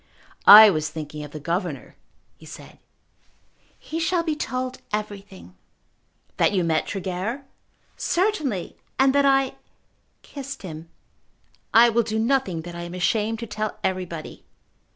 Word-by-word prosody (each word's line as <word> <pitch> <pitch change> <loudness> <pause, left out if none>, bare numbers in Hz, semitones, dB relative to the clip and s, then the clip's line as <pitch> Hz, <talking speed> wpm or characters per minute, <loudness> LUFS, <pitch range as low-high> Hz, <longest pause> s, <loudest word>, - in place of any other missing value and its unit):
"I 215 +1 +11
was 155 -3 -2
thinking 150 -1 -7
of 150 - -8
the 150 - -8
governor," 170 0 -4 0.4
he - - -17
said. - - -12 1.0
"He 325 - -6
shall 335 +1 0
be 320 -2 -1
told 255 -3 -4
everything." 205 - -6 0.8
"That - - +2
you 185 -3 +1
met 160 -2 0
Tregear?" 195 +8 -4 0.5
"Certainly; 315 - -1 0.2
and 265 0 +4
that 280 0 +3
I 270 -1 +2 0.7
kissed 275 -3 -8
him. 165 -2 -8 0.8
I 235 +2 +7
will 235 +1 +2
do 220 -1 -3
nothing 220 -8 0
that 175 +1 -8
I 170 - -7
am 175 +1 -7
ashamed 215 +4 0
to - - -4
tell 215 0 -4
everybody." 180 -4 -4
210 Hz, 135 wpm, -23 LUFS, 175-260 Hz, 1.0 s, I